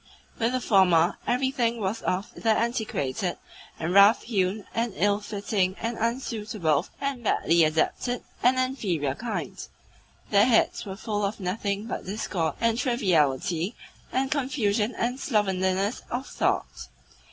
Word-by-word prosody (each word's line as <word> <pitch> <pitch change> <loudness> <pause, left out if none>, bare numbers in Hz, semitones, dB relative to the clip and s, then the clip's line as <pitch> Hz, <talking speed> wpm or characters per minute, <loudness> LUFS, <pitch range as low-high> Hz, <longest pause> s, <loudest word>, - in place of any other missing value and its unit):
With 230 +1 +1
the 255 - +1
former 185 -6 +4
everything 245 -2 +1
was 205 +2 -2
of 185 +3 -2
the 225 - -2
antiquated 200 - -1 0.4
and 165 +2 -2
rough 200 +3 +7
hewn 200 -2 -1
and 230 -2 -1
ill 205 +2 +2
fitting 200 -2 -1
and 230 +1 -2
unsuitable 215 - -1
and 275 -3 -3
badly 170 -5 +3
adapted 160 +10 0 0.2
and 250 +2 +4
inferior 205 - 0
kind; 225 - -5 0.7
their 205 0 +6
heads 235 -2 +2
were 190 - -5
full 210 -2 -2
of 200 +2 -2
nothing 200 +2 -2
but 230 - -5
discord 185 -6 -2
and 230 0 +1
triviality 180 - +1 0.4
and 265 +1 0
confusion 235 -6 0
and 245 +3 -1
slovenliness 195 -3 0
of 250 +3 -3
thought. - - -2
210 Hz, 130 wpm, -26 LUFS, 185-235 Hz, 0.7 s, rough